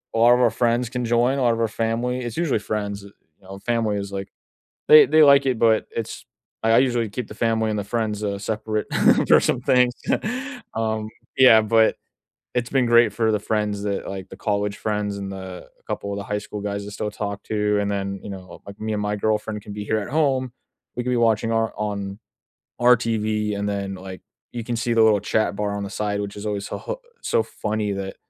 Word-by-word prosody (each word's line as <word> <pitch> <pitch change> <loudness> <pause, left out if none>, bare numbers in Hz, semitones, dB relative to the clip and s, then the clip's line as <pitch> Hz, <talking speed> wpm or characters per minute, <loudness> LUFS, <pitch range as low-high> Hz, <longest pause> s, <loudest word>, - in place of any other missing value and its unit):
a - - +1
lot 120 +1 +7
of 125 - +3
our 120 - +4
friends 120 +1 +1
can 125 -2 -3
join, 120 +3 +2
a - - -1
lot 120 -2 +3
of 115 - -3
our 115 - +2
family 115 +3 -1
it's 120 +1 -5
usually 155 -10 +1
friends, 100 -1 -4
eh, - - -10 0.3
you - - -29
know? 95 +1 -9
Family 115 -3 0
is, 100 0 -5
like, 100 0 -5 0.6
they 155 0 +9
they 155 +1 +6
like 140 -1 +6
it, 130 -3 +1
but 110 -1 +3
it's 115 - -4 0.4
I 115 - +2
I - - +6
usually 120 -4 +1
keep 110 +3 -5
the - - -9
family 110 -1 +1
and 105 - -1
the 100 - -3
friends, 110 -2 -2
uh, 100 -1 -1
separate 110 +1 -2 0.4
for - - +7
some - - 0
things. 125 -1 +3 0.8
Um, 110 -1 -1 0.3
yeah, 120 -4 +8
but 110 +1 +3 0.6
it's 120 0 0
been 130 -2 +2
great 120 -2 +5
for 110 -1 +1
the 105 - +1
friends 105 -1 -1
that, 100 -1 -2
like 95 -1 -6
the - - -11
college 105 0 -1
friends 105 -2 -2
and 100 -1 -5
the 95 -1 -8
a - - -35
couple 100 - -4
of - - -4
the 100 - -4
high 105 +1 -2
school 105 0 -7
guys 100 0 -3
I - - -5
still 105 +1 -4
talk 100 -1 -4
to, 105 -1 0
and 100 0 -1
then, 100 -1 -3
you - - -7
know, 95 -3 -9
like, 100 +1 -10
me 110 0 -2
and 105 - -1
my 105 0 -1
girlfriend 105 0 -1
can 105 - -8
be 105 0 -5
here 110 - 0
at 100 - -6
home. 130 -4 +1 0.4
We 125 - -2
could 125 - -3
be 125 - +1
watching 115 -1 +2
our 115 0 0
on 100 -1 -4 0.6
on 120 - -1
our 125 - +8
TV, 110 -2 -1
and 100 - -1
then, 100 -1 -3
like, 95 0 -9 0.3
you 120 -2 -5
can 120 0 -2
see 120 +1 -1
the 115 - +5
little 110 -2 +5
chat 110 +1 0
bar 100 0 -2
on 100 - -3
the 100 - -6
side, 105 -1 -2
which 100 0 -6
is 105 - -6
always 100 -1 -2
so - - -5
ho - - -6 0.2
so 115 - +2
funny 105 -1 -3
that, 95 -1 -5
110 Hz, 235 wpm, -23 LUFS, 100-115 Hz, 0.8 s, they